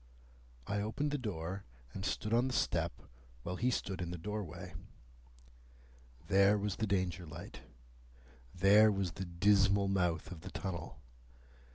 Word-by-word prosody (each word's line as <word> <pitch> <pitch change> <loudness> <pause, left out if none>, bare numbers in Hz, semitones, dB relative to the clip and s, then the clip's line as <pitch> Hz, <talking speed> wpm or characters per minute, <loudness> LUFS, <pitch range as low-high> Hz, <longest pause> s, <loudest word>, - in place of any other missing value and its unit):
I 100 0 -1
opened 140 +8 -1
the 145 - -1
door, 95 -4 -4 0.3
and 95 - -5
stood 105 +3 -1
on 120 +3 +4
the 130 - -2
step, - - 0 0.4
while 90 - -3
he 125 +6 +2
stood 95 -6 -2
in 85 - -3
the 90 - -4
doorway. 105 -1 -5 1.5
There 100 +2 +5
was 100 -2 -2
the 110 - 0
Danger 90 -3 -1
light. 80 +3 -9 0.9
There 105 - +6
was 95 -3 -1
the 95 +2 -5
dismal 100 +2 +4
mouth 90 -4 0
of 85 -3 -8
the 95 - -7
tunnel. 90 -4 -5
95 Hz, 145 wpm, -34 LUFS, 90-105 Hz, 1.5 s, There